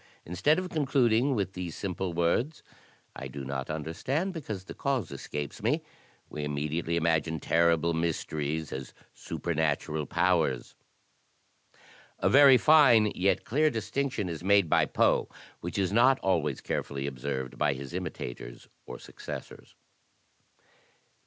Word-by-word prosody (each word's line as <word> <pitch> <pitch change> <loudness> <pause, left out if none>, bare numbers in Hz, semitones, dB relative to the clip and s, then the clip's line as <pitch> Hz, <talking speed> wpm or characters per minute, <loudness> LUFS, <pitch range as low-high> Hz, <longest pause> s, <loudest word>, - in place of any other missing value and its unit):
Instead 95 - +2
of 185 0 -2
con 150 -4 -1
cluding 130 0 +3
with 100 -3 -2
these 90 -4 -5
simple 95 -1 -3
words: 85 - 0 0.5
*I - - -6
do 70 -1 -7
not 65 -1 -4
understand 125 - -2
because 110 - -6
the - - -9
cause 135 - -2
escapes 75 -1 -6
me,' - - 0 0.4
we 75 - -6
immediately 75 +3 -2
imagine 80 -1 +1
terrible 85 0 +2
mysteries 80 -2 -2
as 65 -1 -7 0.2
supernatural 80 -2 -2
powers." 85 -7 +1 1.4
A - - +1
very 140 -2 +8
fine 125 -9 +6
yet 95 +2 +1
clear 155 +6 +2
distinction 125 -2 -2
is 85 -1 -5
made 100 -1 +4
by - - +3
Poe - - +2 0.3
which 85 +3 -5
is 95 0 0
not 130 +4 +5
always 95 -1 0
carefully 70 -1 -3
observed 65 -1 -4
by 75 -2 +2
his 70 0 -8
imitators - - -6 0.2
or - - -7
successors. - - -9
85 Hz, 130 wpm, -29 LUFS, 75-115 Hz, 1.4 s, very